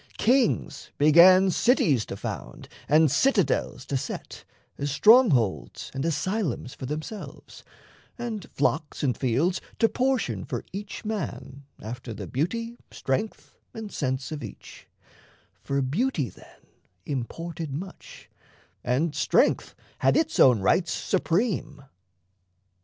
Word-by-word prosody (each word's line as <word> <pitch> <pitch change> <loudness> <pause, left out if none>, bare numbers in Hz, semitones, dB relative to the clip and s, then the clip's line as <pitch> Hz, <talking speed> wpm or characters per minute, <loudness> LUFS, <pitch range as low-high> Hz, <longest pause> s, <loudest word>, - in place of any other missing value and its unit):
Kings 245 0 +1
began 180 +6 +7
Cities 160 - +2
to 100 - -6
found - - -7 0.2
and 155 -1 +5
citadels 195 - +1
to 140 - -3
set, - - -7 0.3
As 145 - -1
strongholds 140 - +3
and 135 0 -3
asylums 165 - -2
for 130 - -7
themselves, 155 - -7 0.5
And 230 -6 -5
flocks 150 +2 -1
and 130 -5 +1
fields 140 - 0 0.2
to 225 - +4
portion 260 +1 0
for - - -5
each 200 +2 -7
man 150 -9 -5
After 115 +1 -7
the 100 -1 -6
beauty, 230 - -3
strength, 135 +12 -3 0.2
and 220 -2 -7
sense 130 -1 -2
of 150 -3 -5
each 105 - -11 0.7
For 140 0 -1
beauty 155 - 0
then - - -18 0.4
imported 160 +4 -5
much, 180 +7 -8 0.6
and 145 +6 0
strength - - +2 0.2
Had - - +3
its 320 0 0
own 125 -6 +6
rights 165 - +2
supreme. 175 - -1
155 Hz, 115 wpm, -26 LUFS, 135-210 Hz, 0.7 s, began